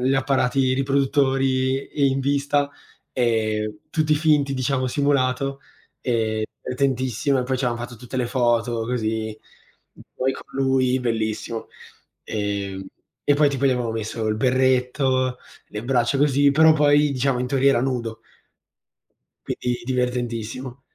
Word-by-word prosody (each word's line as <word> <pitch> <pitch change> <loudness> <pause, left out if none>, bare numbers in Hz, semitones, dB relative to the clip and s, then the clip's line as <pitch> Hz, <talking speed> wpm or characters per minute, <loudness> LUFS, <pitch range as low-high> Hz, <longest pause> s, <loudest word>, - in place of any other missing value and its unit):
gli 130 +2 +2
apparati 135 -1 +2
riproduttori 135 -1 +1 0.2
in 135 - 0
vista, 140 +1 +1 0.4
ehm, 110 -3 0
tutti 155 -1 +2
finti 150 -3 +2
diciamo, 130 0 0
simulato, 135 0 0 0.4
ehm, 110 -3 0 0.2
divertentissimo 130 0 0
e 125 - +1
poi 130 +1 -1
c'avevamo 120 -2 -1
fatto 120 0 -7
tutte 125 +3 -8
le 125 - +1
foto, 120 -2 +1
così, 110 -2 -2 0.8
poi 130 +1 0
con - - -10 0.2
lui 130 -1 +2
bellissimo. 110 -1 -2 0.6
Ehm, 100 -2 -3 0.4
e 145 - +4
poi 145 0 +4
tipo 140 0 0
gli - - +4
avevamo 125 -3 -1
messo 110 0 -3
il 110 - +1
berretto, 130 +1 +1 0.3
le 105 +2 -6
braccia 125 +1 +1
così, 145 0 +4
però 160 +3 +6
poi 145 -1 +4
diciamo, 130 -1 0
in 125 - -1
teoria 135 +1 +3
era 120 - +2
nudo. 115 -4 -2 1.4
Quindi 125 0 -2
divertentissimo. 125 0 -3
130 Hz, 130 wpm, -23 LUFS, 120-135 Hz, 1.4 s, però